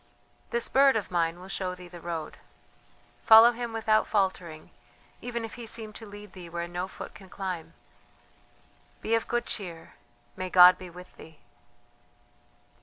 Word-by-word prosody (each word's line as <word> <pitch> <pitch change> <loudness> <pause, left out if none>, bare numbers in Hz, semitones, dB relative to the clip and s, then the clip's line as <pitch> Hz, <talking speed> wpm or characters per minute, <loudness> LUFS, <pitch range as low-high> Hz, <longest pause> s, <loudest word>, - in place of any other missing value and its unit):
"This 235 - 0
bird 275 -1 +5
of 210 -4 -2
mine 170 -1 0
will 185 - -11
show 185 -1 -3
thee 180 0 -12
the 175 -1 -12
road. 165 -2 -5 0.8
Follow 225 +2 +9
him 240 0 -5
without 220 -1 +2
faltering, 185 -6 -2 0.5
even 235 -1 -4
if 225 - -9
he 240 -2 -8
seem 220 -1 -6
to 225 - -10
lead 205 -1 -12
thee 180 -3 -10
where 170 0 -4
no 175 +1 -4
foot - - -9
can 190 -2 -14
climb. 175 -4 -6 1.3
Be 225 - -1
of 230 0 +1
good 240 0 -1
cheer, 175 -6 -6 0.4
may 185 0 -4
God 180 0 +8
be 185 - -9
with 180 +1 -13
thee!" 160 -1 -14
185 Hz, 160 wpm, -28 LUFS, 175-225 Hz, 1.3 s, Follow